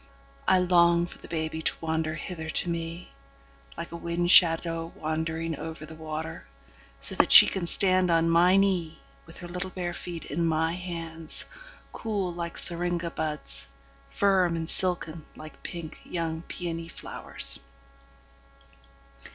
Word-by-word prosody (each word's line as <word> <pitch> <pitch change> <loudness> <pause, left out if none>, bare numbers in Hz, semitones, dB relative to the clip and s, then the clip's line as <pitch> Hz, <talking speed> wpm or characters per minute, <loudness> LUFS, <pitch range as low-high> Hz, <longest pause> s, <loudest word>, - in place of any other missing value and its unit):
I 190 - +5
long 170 -1 +4
for - - -12
the - - -13
baby 160 -1 -3
to - - +1
wander 160 -1 -2
hither 160 -1 -6
to 175 - +2
meLike 70 - -9
a - - -7
wind 170 +1 -1
shadow 165 -1 +4
wandering 160 +1 -3
over 160 +1 -7
the 160 - -11
water, 155 - -7 0.5
So - - +5
that - - +2
she - - +11
can 180 -3 -3
stand 185 0 +6
on 165 0 +3
my 175 +3 +4
kneeWith 160 - -2
her 175 - -7
little 180 +2 -5
bare 180 -2 -4
feet 170 -3 -7
in 165 +4 -2
my 160 0 +1
hands, 165 -3 -6 0.5
Cool 200 -5 -3
like 170 0 -5
syringa 175 0 +3
buds, 145 - -5 0.4
Firm 185 - +2
and 165 -1 -4
silken 170 -3 -2
like 155 0 -12
pink 170 -3 -8
young 165 -2 -4
peony 165 -2 -5
flowers. 165 - 0
165 Hz, 135 wpm, -27 LUFS, 160-175 Hz, 0.5 s, she